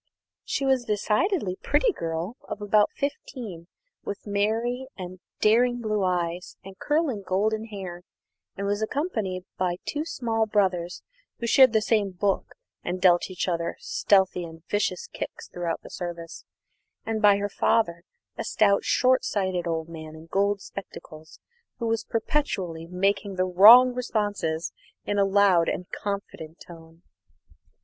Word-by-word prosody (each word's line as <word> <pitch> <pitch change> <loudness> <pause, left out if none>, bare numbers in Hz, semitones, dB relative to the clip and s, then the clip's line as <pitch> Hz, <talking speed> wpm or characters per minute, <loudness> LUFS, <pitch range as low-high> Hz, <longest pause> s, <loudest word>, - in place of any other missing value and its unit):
She 275 - -2
was 265 -2 +2
a - - -22
decidedly 210 - 0
pretty 295 - +2
girl 165 - -4
of - - -4
about 210 0 +3
fifteen, 245 - -5 0.4
with 205 - -6
merry 225 +5 -1
and 185 -1 -7 0.2
daring 245 +3 +4
blue 215 -3 -1
eyes 180 -1 -2
and 195 0 -10
curling 295 -8 0
golden 215 +4 0
hair, 190 -5 -7 0.6
and 200 - -3
was 205 +1 -1
accompanied 220 - -2
by 180 -1 +1
two 300 0 -2
small 225 -7 -1
brothers 185 -4 0 0.3
(who 235 - -4
shared 255 +1 +6
the 220 -1 +2
same 210 -3 +2
book 195 +2 -1 0.3
and 180 +1 -3
dealt 180 -1 +4
each 185 0 -3
other 170 -1 -1
stealthy 190 -3 +2
and 165 -1 -11
vicious 200 -3 -1
kicks - - -7
throughout 175 -2 -4
the - - -11
service), 170 -2 -7 0.6
and 220 -1 -2
by 205 -2 +6
her 200 0 -1
father, 170 -4 +1 0.4
a - - -1
stout, 200 -2 +2
short 255 0 +3
sighted 185 -4 -1
old 160 -1 -1
gentleman 160 -1 -9
in 160 +1 -12
gold 200 +3 0
spectacles, 160 -6 -10 0.4
who 235 - -3
was 225 -1 0
perpetually 190 - -2
making 195 +2 0
the 185 0 +1
wrong 225 +8 +8
responses 205 -9 -2 0.3
in 205 0 0
a 200 - +4
loud 195 -4 +4
and 180 -1 -4
confident 195 -5 -5
tone. 165 0 -14
200 Hz, 145 wpm, -26 LUFS, 175-220 Hz, 0.6 s, wrong